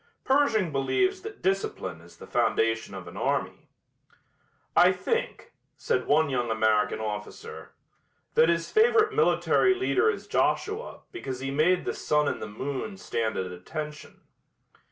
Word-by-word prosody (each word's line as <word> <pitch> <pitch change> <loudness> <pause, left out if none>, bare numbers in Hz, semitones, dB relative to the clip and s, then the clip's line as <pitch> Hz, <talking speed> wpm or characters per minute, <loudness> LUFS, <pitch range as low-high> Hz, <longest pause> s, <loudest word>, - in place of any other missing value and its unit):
Pershing 235 - +2
believes 375 - +1
that 430 +1 -9
discipline 185 - -2
is 85 +1 -17
the - - -11
foundation 115 -3 0
of 95 -2 -8
an 85 - -10
army. - - -2 1.1
"I 180 +1 +7
think," 465 - -3 0.2
said 470 - -1
one 155 +2 +4
young 125 -4 -1
American 110 -2 +2
officer, 105 -1 -6 0.6
"that 160 - +5
his 170 0 0
favorite 440 -1 +4
military 415 -4 +3
leader 385 +3 +2
is 445 - -3
Joshua 430 +3 -1
because 130 - -6
he 135 0 -3
made 165 +6 +2
the - - -1
sun 150 -1 +1
and - - -2
the - - -4
moon 140 - -5
stand 115 -10 -2
at 90 -1 -3
attention." 150 - -7
155 Hz, 140 wpm, -27 LUFS, -, 1.1 s, I